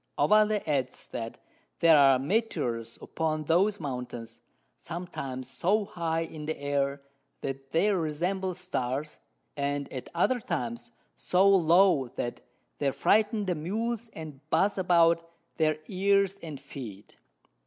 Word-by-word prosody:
Ovalle 215 -1 +4
adds, 135 -4 -1
That 115 -1 -5 0.4
there 165 -1 +7
are 135 -2 +6
Meteors 125 - -1
upon 155 -1 -2
those 195 +7 +2
Mountains 125 -5 -6 0.4
sometimes 135 -7 -6
so 200 +10 +1
high 165 -3 -2
in 155 -2 -6
the 160 - -2
Air, 140 0 -1 0.4
that 135 0 -5
they 200 +8 +2
resemble 180 +3 -1
Stars, 150 -5 -3 0.4
and 140 0 -1
at 130 - -6
other 245 +9 +2
times 120 - -4 0.3
so 185 +2 +3
low, 180 -6 +5
that 120 - -4 0.4
they 140 - +2
frighten 210 - +2
the 185 - +1
Mules 225 +8 -3
and 155 -4 -9
buz 200 +3 +2
about 170 -2 +3 0.3
their 155 -1 +2
Ears 195 0 +2
and 155 -5 -7
Feet. 115 -7 -9
160 Hz, 125 wpm, -28 LUFS, 135-190 Hz, 0.4 s, there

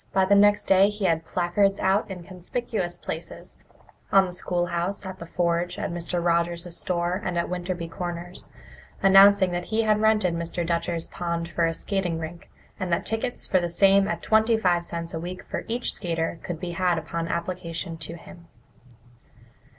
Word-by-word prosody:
By 190 -1 +4
the 195 - +3
next 205 +1 +5
day 195 +1 +5
he 210 -1 -3
had 165 -2 +1
placards 195 +3 +1
out 195 +3 +2
in 180 -2 -7
conspicuous 185 +1 -4
places - - -7 0.5
on 195 -1 +6
the 180 - -6
schoolhouse, 175 +2 -2
at 190 0 -7
the 170 - -8
forge, 170 +1 0
at - - -3
Mr. 175 0 -2
Rogers's 170 0 0
store, 175 +2 -1
and 180 -1 -2
at 170 - 0
Winterby 180 -1 -3
Corners 175 0 -6 0.5
announcing 195 -1 +7
that 175 0 -3
he 225 0 0
had 215 -1 +2
rented 215 -5 +3
Mr. 170 +1 -2
Dutcher's 170 0 -1
pond 170 -1 -3
for 170 -1 +1
a 165 - -1
skating 185 -4 -1
rink, 165 +1 -7 0.3
and 185 -2 -3
that 170 - 0
tickets 225 +3 -2
for 185 - +2
the 175 -1 -2
same 195 +2 +4
at 215 - -3
twenty 220 +1 +3
five 180 -5 +2
cents 170 -1 -5
a 160 - -3
week 180 +2 -6
for - - -5
each 235 +2 -1
skater 165 -2 -2
could 175 -3 -5
be 175 0 -4
had 175 0 +1
upon 165 +1 -3
application 170 0 -3
to 160 +1 -5
him. 170 0 -14
175 Hz, 180 wpm, -25 LUFS, 170-195 Hz, 0.5 s, announcing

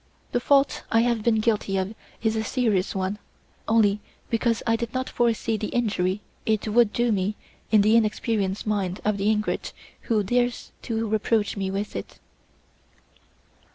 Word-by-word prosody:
The 245 - +1
fault 275 +2 +3
I 225 - +5
have 235 -2 +1
been 220 0 +2
guilty 210 -3 +1
of 190 +3 -2 0.3
is 220 -1 +1
a 220 - 0
serious 215 -6 0
one 190 +2 -2 0.5
only 210 -2 +3 0.3
because 230 0 +1
I 230 - +3
did 235 +1 -4
not 260 0 -1
foresee 230 -1 0
the 210 - -3
injury 205 -5 0 0.2
it 220 -1 0
would 220 0 +4
do 240 +1 +1
me 200 +1 0 0.4
in 215 -2 +6
the 215 +2 +4
inexperienced 215 -3 0
mind 200 -3 -1
of 210 -1 +1
the 200 +2 +1
ingrate 215 -1 -1 0.4
who 215 -3 +3
dares 245 +3 0 0.2
to 225 -1 -1
reproach 215 0 +1
me 195 -2 -2
with 200 +2 -3
it." - - -6
220 Hz, 160 wpm, -25 LUFS, 205-230 Hz, 0.5 s, in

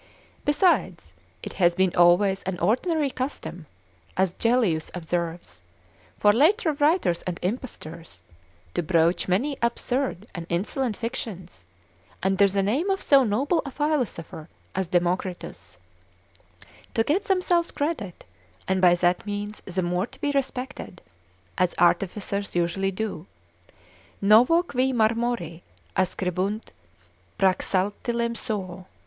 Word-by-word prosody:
Besides, 220 - +1 0.3
it - - -6
hath 175 -2 +2
been 190 -1 +2
always 190 +3 +4
an 190 -1 -4
ordinary 275 - +1
custom, 250 - -5 0.5
as 185 -1 +2
Gellius 225 -10 +1
observes, 170 - -4 0.6
for 205 0 +5
later 320 - +3
writers 290 - +2
and 180 -2 -2
impostors, 170 - -6 0.5
to - - 0
broach 170 +1 +2
many 260 +10 0
absurd 235 -2 -1
and 170 -3 -6
insolent 210 +6 -1
fictions, 200 - -6 0.6
under 195 +1 +4
the 195 0 0
name 270 - 0
of 385 0 +1
so 275 -2 +5
noble 260 - +1
a 285 - -6
philosopher 255 - -2 0.2
as 190 -1 -1
Democritus, 180 +1 -2 1.2
to 225 - +3
get 350 - 0
themselves 360 -3 +2
credit, 285 - -4 0.4
and 190 0 +1
by 175 -1 +6
that 175 0 +1
means 205 +1 -4
the 185 0 -2
more 180 +4 0
to 265 - -17
be 290 - 0
respected, 265 -8 -4 0.6
as 180 -1 +2
artificers 200 +3 +1
usually 175 +3 +1
do, 195 -4 -4 0.9
Novo 240 - +5
qui 260 -5 0
marmori 225 -7 0 0.3
ascribunt 190 +3 -1 0.7
Praxatilem 205 +5 0
suo. 190 -6 -4
200 Hz, 115 wpm, -25 LUFS, 180-255 Hz, 1.2 s, by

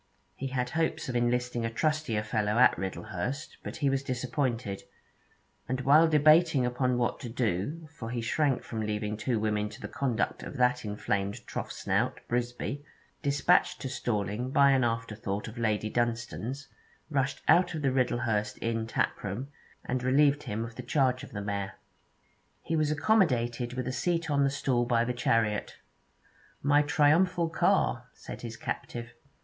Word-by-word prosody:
He 135 - -4
had 125 -1 -2
hopes 160 -4 -1
of 125 - -3
enlisting 120 0 0
a 115 - 0
trustier 150 -3 0
fellow 110 -1 0
at 125 - +6
Riddlehurst, 95 - -4
but - - -6
he 140 -3 +1
was 135 0 +1
disappointed; 125 -5 -2 0.9
and 130 0 -1
while 150 +5 +6
debating 155 -2 +5
upon 125 0 0
what 120 -1 0
to 120 - -6
do, 120 - -2
for 115 -6 -7
he 120 0 -2
shrank 130 +3 +1
from 110 -1 -4
leaving 105 0 -2
two 110 +2 -1
women 105 -1 0
to - - -11
the - - -6
conduct 125 -5 -1
of - - -7
that 125 0 +2
inflamed 100 -1 -2
troughsnout, - - -2
Brisby, 120 +4 -2 0.4
despatched 145 +5 +3
to 135 - -3
Storling 120 -2 -2
by 140 +1 +5
an 130 -2 +3
afterthought 110 -3 -2
of 115 +2 -8
Lady 110 -2 0
Dunstane's, 120 +3 -2 0.4
rushed 135 -1 -1
out 175 -1 +5
of 155 - -4
the 135 - +3
Riddlehurst 115 -5 0
inn 115 -1 -1
taproom, 115 +3 -2 0.4
and 125 0 -1
relieved 140 +3 +3
him 110 +2 -3
of 115 - -9
the - - -4
charge 125 0 +1
of - - -9
the 100 - -4
mare. 100 -1 -3 0.9
He 165 - -1
was 155 -2 +2
accommodated 125 - +2
with 130 -1 -3
a 130 - -2
seat 165 +4 0
on 140 -1 +3
a - - +2
stool 125 -3 0
in 115 0 +3
the 125 - 0
chariot. 115 -4 0 0.9
'My 145 +1 +5
triumphal 165 +4 +3
car,' - - +1
said - - -9
his 115 -1 -6
captive. 120 0 -5
125 Hz, 160 wpm, -29 LUFS, 115-140 Hz, 0.9 s, at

